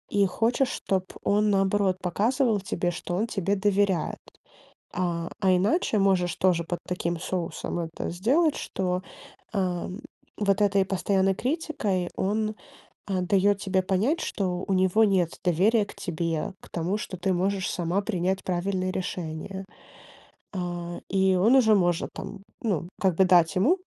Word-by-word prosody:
и 200 Hz, -1 st, +5 dB
хочешь 235 Hz, +7 st, +1 dB
чтоб 190 Hz, -2 st, -1 dB, 0.2 s
он 210 Hz, +1 st, +2 dB
наоборот 195 Hz, -1 st, +2 dB
показывал 220 Hz, +5 st, +1 dB
тебе, 175 Hz, -2 st, -1 dB
что 175 Hz, 0 st, -4 dB
он 215 Hz, +5 st, 0 dB
тебе 200 Hz, -2 st, 0 dB
доверяет. 195 Hz, -3 st, +1 dB, 0.8 s
А, 170 Hz, -2 st, -2 dB
а 190 Hz, -2 st, +4 dB
иначе 215 Hz, -, +1 dB
можешь 180 Hz, -4 st, +2 dB
тоже 180 Hz, -3 st, +2 dB
под 175 Hz, +1 st, -4 dB
таким 170 Hz, -2 st, -2 dB
соусом 175 Hz, -1 st, -3 dB
это 165 Hz, -1 st, -4 dB
сделать, 270 Hz, -, +2 dB
что, 180 Hz, -1 st, -2 dB, 0.5 s
а, 180 Hz, -4 st, -1 dB, 0.5 s
вот 200 Hz, -1 st, +1 dB
этой 200 Hz, -1 st, +4 dB
постоянной 195 Hz, 0 st, +1 dB
критикой 245 Hz, -, -1 dB
он, 215 Hz, +2 st, -1 dB, 0.5 s
а, 190 Hz, -2 st, 0 dB
даёт 200 Hz, +2 st, +2 dB
тебе 190 Hz, -1 st, +2 dB
понять, 210 Hz, -, +1 dB
что 185 Hz, -2 st, -2 dB
у 195 Hz, -, +1 dB
него 190 Hz, +4 st, +4 dB
нет 185 Hz, -5 st, +1 dB
доверия 200 Hz, +6 st, +3 dB
к -, -, -12 dB
тебе, 165 Hz, -2 st, -2 dB
к -, -, -15 dB
тому, 175 Hz, +4 st, -1 dB
что 190 Hz, -3 st, -6 dB
ты 185 Hz, +2 st, 0 dB
можешь 190 Hz, +2 st, 0 dB
сама 175 Hz, +3 st, 0 dB
принять 190 Hz, -2 st, -1 dB
правильное 185 Hz, +1 st, -1 dB
решение. 185 Hz, +1 st, -5 dB, 0.9 s
А, 175 Hz, -2 st, -4 dB
и 190 Hz, -1 st, +3 dB
он 220 Hz, +8 st, +5 dB
уже 220 Hz, -5 st, +6 dB
может, 175 Hz, -3 st, +1 dB
там, -, -, -7 dB, 0.2 s
ну, 185 Hz, -7 st, -1 dB
как 190 Hz, -3 st, +2 dB
бы 190 Hz, -, +5 dB
дать 175 Hz, -1 st, +4 dB
ему 255 Hz, -, +3 dB
190 Hz, 150 wpm, -26 LUFS, 180-205 Hz, 0.9 s, уже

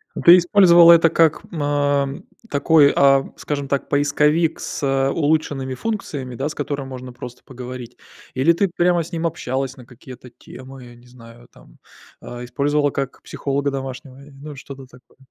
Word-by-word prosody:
Ну, -, -, -5 dB
ты 175 Hz, +1 st, +8 dB
использовала 175 Hz, -2 st, +6 dB
это 165 Hz, 0 st, +4 dB
как, 165 Hz, -1 st, +2 dB
а, 145 Hz, -2 st, 0 dB, 0.4 s
такой, 145 Hz, 0 st, +4 dB
а, 135 Hz, -1 st, +4 dB
скажем 145 Hz, -2 st, -5 dB
так, 140 Hz, 0 st, -3 dB
поисковик 150 Hz, +3 st, +1 dB
с 135 Hz, -1 st, -1 dB
улучшенными 145 Hz, -4 st, -1 dB
функциями, 145 Hz, -, -5 dB
да, 135 Hz, +4 st, -3 dB
с 150 Hz, -, -7 dB
которым 140 Hz, -2 st, -4 dB
можно 130 Hz, -1 st, -9 dB
просто 125 Hz, 0 st, -11 dB
поговорить, 125 Hz, -1 st, -10 dB, 0.4 s
или 140 Hz, +6 st, +3 dB
ты 195 Hz, +3 st, 0 dB
прямо 175 Hz, -1 st, +1 dB
с 165 Hz, -, -13 dB
ним 165 Hz, 0 st, -2 dB
общалась 130 Hz, -4 st, -4 dB
на 125 Hz, -, -14 dB
какие-то 125 Hz, +1 st, -14 dB
темы, 130 Hz, +1 st, -13 dB
я 120 Hz, 0 st, -14 dB
не 120 Hz, +1 st, -20 dB
знаю, 120 Hz, -1 st, -16 dB
там, -, -, -21 dB, 0.4 s
а, 120 Hz, 0 st, -8 dB
использовала 145 Hz, +3 st, 0 dB
как 135 Hz, -1 st, -5 dB
психолога 140 Hz, 0 st, -3 dB
домашнего, 135 Hz, 0 st, -8 dB
и, 145 Hz, -, -17 dB
ну, 145 Hz, +2 st, -11 dB
что-то 135 Hz, 0 st, -11 dB
такое. 125 Hz, -1 st, -22 dB
140 Hz, 165 wpm, -20 LUFS, 130-155 Hz, 0.4 s, ты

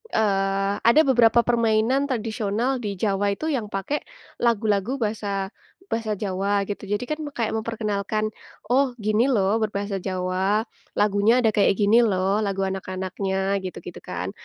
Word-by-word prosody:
eee, 195 Hz, -1 st, +1 dB
ada 235 Hz, +7 st, +5 dB
beberapa 235 Hz, -3 st, +4 dB
permainan 235 Hz, +3 st, +2 dB
tradisional 230 Hz, +1 st, -1 dB
di 205 Hz, -4 st, -4 dB
Jawa 200 Hz, 0 st, 0 dB
itu 315 Hz, +6 st, -3 dB
yang 235 Hz, -7 st, -1 dB
pakai 205 Hz, +9 st, -2 dB, 0.4 s
lagu-lagu 220 Hz, 0 st, +1 dB
bahasa 205 Hz, -4 st, -2 dB, 0.4 s
bahasa 225 Hz, -2 st, -1 dB
Jawa 200 Hz, 0 st, 0 dB
gitu 200 Hz, 0 st, -6 dB
jadi 205 Hz, +3 st, -1 dB
kan 305 Hz, +3 st, -3 dB, 0.2 s
kayak 230 Hz, -3 st, -1 dB
memperkenalkan, 215 Hz, -1 st, -2 dB, 0.4 s
"Oh 260 Hz, -1 st, +3 dB
gini 215 Hz, +2 st, +1 dB
loh 215 Hz, -4 st, +2 dB
berbahasa 200 Hz, -2 st, -2 dB
Jawa 185 Hz, +3 st, 0 dB, 0.4 s
lagunya 210 Hz, +4 st, +3 dB
ada 220 Hz, -, +4 dB
kayak 200 Hz, -1 st, +3 dB
gini 210 Hz, +3 st, +4 dB
loh 195 Hz, -2 st, +2 dB
lagu 195 Hz, -2 st, -1 dB
anak-anaknya," 190 Hz, +1 st, -2 dB
gitu-gitu 185 Hz, -2 st, -8 dB
kan, 90 Hz, +2 st, -5 dB
210 Hz, 135 wpm, -24 LUFS, 195-230 Hz, 0.4 s, ada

